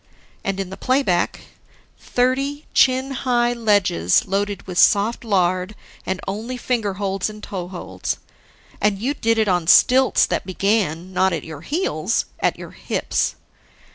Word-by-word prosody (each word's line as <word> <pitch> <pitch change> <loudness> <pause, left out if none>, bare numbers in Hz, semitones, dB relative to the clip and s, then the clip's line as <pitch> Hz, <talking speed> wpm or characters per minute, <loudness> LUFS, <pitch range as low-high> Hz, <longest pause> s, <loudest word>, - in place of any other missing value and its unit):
And 195 0 -2
in 190 -1 -4
the 190 - -7
playback: 255 -10 +1 0.6
Thirty 275 +4 -1
chin 260 +1 +3
high 245 -2 +1
ledges 205 - +2
loaded 200 0 -2
with 180 -2 -3
soft 210 +4 +3
lard, 185 -2 0 0.3
and 190 0 -1
only 220 +6 -4
finger 225 -6 -1
holds 195 0 -2
and 215 0 -11
toe 180 -3 -5
holds. 95 - -5 0.6
And 205 -1 +2
you 250 +8 -1
did 230 -5 0
it 220 -1 +2
on 175 -3 +1
stilts 260 +8 +5
that - - -2
began, 185 -3 -1
not 190 0 +2
at 160 - -3
your 160 -2 -9
heels, 335 - -1
at - - +1
your - - -9
hips. - - -2
205 Hz, 145 wpm, -21 LUFS, 185-240 Hz, 0.6 s, stilts